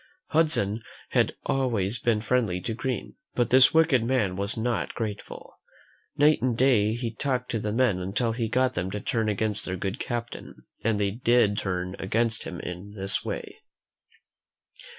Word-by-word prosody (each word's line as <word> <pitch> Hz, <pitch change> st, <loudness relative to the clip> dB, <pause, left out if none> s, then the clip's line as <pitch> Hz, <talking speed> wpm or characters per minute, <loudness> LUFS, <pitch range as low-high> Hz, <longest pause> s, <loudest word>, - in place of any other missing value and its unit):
Hudson 150 Hz, -10 st, +2 dB, 0.3 s
had -, -, +1 dB
always 120 Hz, -5 st, 0 dB
been 115 Hz, -3 st, +1 dB
friendly 110 Hz, -5 st, +1 dB
to 115 Hz, -, -3 dB
Green, 125 Hz, +2 st, -4 dB, 0.2 s
but 120 Hz, -1 st, +1 dB
this 130 Hz, 0 st, +7 dB
wicked 160 Hz, -7 st, +4 dB
man 115 Hz, -7 st, +1 dB
was 100 Hz, +3 st, 0 dB
not 115 Hz, +1 st, -1 dB
grateful. 105 Hz, -3 st, -6 dB, 0.6 s
Night 150 Hz, +2 st, +4 dB
and 125 Hz, -3 st, 0 dB
day 115 Hz, -5 st, +3 dB
he 120 Hz, -1 st, -4 dB
talked 125 Hz, 0 st, -2 dB
to 115 Hz, -, -1 dB
the 105 Hz, 0 st, -2 dB
men 115 Hz, -5 st, +2 dB
until 100 Hz, +6 st, -1 dB
he 115 Hz, -1 st, -2 dB
got 130 Hz, +2 st, +2 dB
them 90 Hz, -2 st, -2 dB
to 105 Hz, -, -4 dB
turn 110 Hz, +1 st, -1 dB
against 105 Hz, 0 st, 0 dB
their 95 Hz, 0 st, -3 dB
good 95 Hz, +2 st, -3 dB
captain. 120 Hz, -1 st, -5 dB, 0.2 s
And 110 Hz, -2 st, +1 dB
they 100 Hz, +4 st, -2 dB
c/id 115 Hz, -4 st, +4 dB
turn 90 Hz, -1 st, -3 dB
against 110 Hz, +3 st, 0 dB
him 90 Hz, -, -6 dB
in 90 Hz, +4 st, -7 dB
this 95 Hz, -1 st, +1 dB
way. -, -, -6 dB
115 Hz, 165 wpm, -26 LUFS, 100-125 Hz, 0.6 s, this